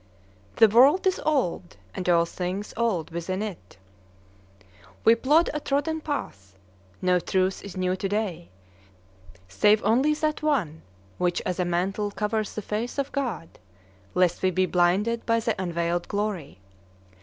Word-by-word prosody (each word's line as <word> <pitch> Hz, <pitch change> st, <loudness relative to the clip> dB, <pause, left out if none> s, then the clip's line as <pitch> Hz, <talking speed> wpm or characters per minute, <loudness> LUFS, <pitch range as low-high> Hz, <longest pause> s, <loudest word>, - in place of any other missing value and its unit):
"The 225 Hz, -, +7 dB
world 265 Hz, -, +5 dB
is 380 Hz, 0 st, +1 dB
old, 190 Hz, -, -1 dB, 0.2 s
and 180 Hz, -, -3 dB
all 170 Hz, -1 st, +4 dB
things 185 Hz, +4 st, -5 dB
old 220 Hz, -9 st, -1 dB
within 185 Hz, +4 st, -3 dB
it." 170 Hz, -, -8 dB, 1.3 s
We 225 Hz, -, +8 dB
plod 295 Hz, +8 st, +3 dB
a 300 Hz, -, -2 dB
trodden 300 Hz, +3 st, -1 dB
path. 95 Hz, -, -5 dB, 0.5 s
No 180 Hz, 0 st, +3 dB
truth 185 Hz, +2 st, -1 dB
is 200 Hz, -2 st, -9 dB
new 185 Hz, 0 st, 0 dB
to 195 Hz, +1 st, -3 dB
day, 200 Hz, -, -3 dB, 1.0 s
save 205 Hz, -, +3 dB
only 265 Hz, +7 st, +3 dB
that 305 Hz, 0 st, -1 dB
one 215 Hz, -, 0 dB, 0.4 s
which 175 Hz, -1 st, +1 dB
as 185 Hz, 0 st, -2 dB
a 180 Hz, -, +1 dB
mantle 190 Hz, +4 st, -1 dB
covers 210 Hz, +1 st, -2 dB
the 215 Hz, -, -4 dB
face 220 Hz, +7 st, -3 dB
of 280 Hz, -1 st, -2 dB
God, 235 Hz, -, -4 dB, 0.6 s
lest 180 Hz, -1 st, +2 dB
we 185 Hz, -, +3 dB
be 185 Hz, 0 st, +1 dB
blinded 185 Hz, +7 st, +1 dB
by 230 Hz, 0 st, +3 dB
the 225 Hz, 0 st, 0 dB
unveiled 170 Hz, -1 st, -1 dB
glory. 200 Hz, -, -3 dB
200 Hz, 145 wpm, -25 LUFS, 175-235 Hz, 1.3 s, We